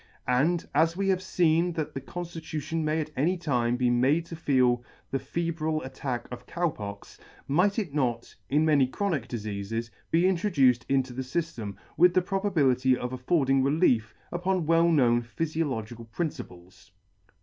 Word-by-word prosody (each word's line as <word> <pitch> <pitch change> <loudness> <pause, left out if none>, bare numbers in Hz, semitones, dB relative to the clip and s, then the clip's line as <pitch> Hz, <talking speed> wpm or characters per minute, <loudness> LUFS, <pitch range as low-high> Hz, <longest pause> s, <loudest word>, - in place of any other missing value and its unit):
And, 155 +8 +2
as 165 +4 +2
we 195 0 0
have 185 -1 +2
feen 175 -2 +1
that 155 -2 -3
the 135 - -5
conflitution 160 0 -5
may 155 +1 0
at 155 - -6
any 170 +7 +1
time 125 -8 0
be 125 -1 +2
made 135 +7 +2
to 165 - -8
feel 125 -6 +2 0.3
the 135 - 0
febrile 160 +2 -2
attack 130 -2 -4
of 125 - -8
Cow 175 -2 0
Pox, 100 -4 -9 0.3
might 180 +8 +2
it 190 -10 -2
not, 120 -5 -1 0.2
in 150 +3 +3
many 145 -4 +4
chronic 155 - -2
difeafes, 110 0 -4 0.2
be 170 +2 +3
introduced 160 - +2
into 135 -2 +1
the 130 - -4
fyllem, 130 - -4 0.2
with 175 +1 +5
the 185 - +5
probability 145 -11 +2
of 125 +1 -4
affording 135 0 +2
relief, 135 -5 +2 0.2
upon 180 0 0
well 165 +1 +4
known 120 -7 +4
phyfiological 120 -5 -3
principles 120 - -6
*? 90 - -41
145 Hz, 160 wpm, -27 LUFS, 125-170 Hz, 0.3 s, with